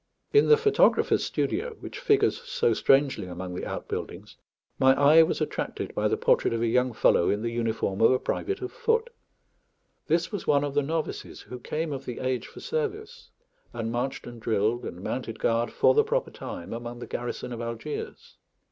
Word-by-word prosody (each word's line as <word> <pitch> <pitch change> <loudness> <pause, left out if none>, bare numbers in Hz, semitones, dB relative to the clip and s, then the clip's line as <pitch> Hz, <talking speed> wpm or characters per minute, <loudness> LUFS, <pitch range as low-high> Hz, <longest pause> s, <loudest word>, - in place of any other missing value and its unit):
In 430 - +6
the 450 - +7
photographer's 425 -1 +3
studio, 480 -2 -2
which - - -8
figures 430 -2 +2
so 485 -1 +1
strangely 135 -8 +2
among 90 0 -6
the 90 - -5
outbuildings, - - -6 0.4
my 130 0 +6
eye 150 +3 +7
was 160 - +1
attracted - - -3
by - - +1
the - - 0
portrait - - +2
of 115 - -2
a - - +2
young 125 +2 +2
fellow 110 -6 +3
in 105 +2 0
the 115 - -1
uniform 115 -4 -1
of 115 - +7
a 130 - +4
private 395 - -3
of 380 - -4
foot. 470 -1 0 1.0
This 165 +1 +1
was 205 - -5
one 145 -1 +4
of 145 -1 -3
the 145 - +2
novices, 160 +2 -4
who 125 - -9
came 155 +4 -3
of 135 - -6
the 125 - -5
age 130 -1 -2
for - - -12
service, 450 0 -4 0.4
and 115 0 -3
marched 125 +3 -3
and 120 -1 -10
drilled 110 +2 0
and 90 +2 -7
mounted 115 -2 -4
guard 115 +1 0
for 130 - +4
the - - +4
proper - - -1
time 85 - -7
among 120 +1 -6
the 120 - -7
garrison 120 0 -5
of 120 - -5
Algiers. 115 +5 -6
130 Hz, 190 wpm, -27 LUFS, -, 1.0 s, the